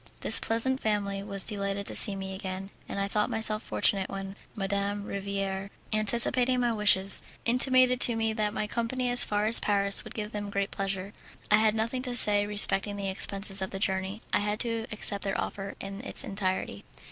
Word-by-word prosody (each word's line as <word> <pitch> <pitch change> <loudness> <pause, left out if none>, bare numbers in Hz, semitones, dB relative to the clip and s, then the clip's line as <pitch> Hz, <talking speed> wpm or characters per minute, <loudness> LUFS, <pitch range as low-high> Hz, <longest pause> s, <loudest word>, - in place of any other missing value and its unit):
This - - +4
pleasant 260 +4 0
family 200 -3 -3
was 200 -1 0
delighted 200 -1 -4
to - - -4
see 200 - +9
me 190 0 -7
again, 190 0 -7 0.2
and - - -5
I 200 - -2
thought 210 +1 -2
myself 215 -1 -1
fortunate 195 -5 -1
when 195 0 -8 0.2
Madame 200 0 -3
Riviere, 195 -1 -5 0.2
anticipating 235 +4 +1
my 240 -1 0
wishes, 200 -2 +2 0.2
intimated 250 +1 +2
to 235 - +4
me 225 -1 -2
that 215 -1 -2
my 210 - -4
company 240 +3 -3
as 245 - +7
far 210 0 -2
as 225 +2 +3
Paris 200 -1 +5
would - - -12
give 210 -1 -5
them 205 -1 -6
great 200 0 -3
pleasure. 195 0 -5 0.4
I 210 - +6
had 215 0 +1
nothing 230 +3 -3
to 250 -1 -6
say 205 -2 +4
respecting 205 -1 +4
the 200 -1 -5
expenses 195 0 +1
of 190 - -4
the 195 - -7
journey. 190 +1 -4
I - - +2
had 210 +1 -3
to 230 -1 -4
accept 205 -1 -1
their 195 -1 -3
offer 195 0 -6
in 195 +1 -8
its - - +6
entirety. 190 - -4
205 Hz, 195 wpm, -27 LUFS, 195-220 Hz, 0.4 s, see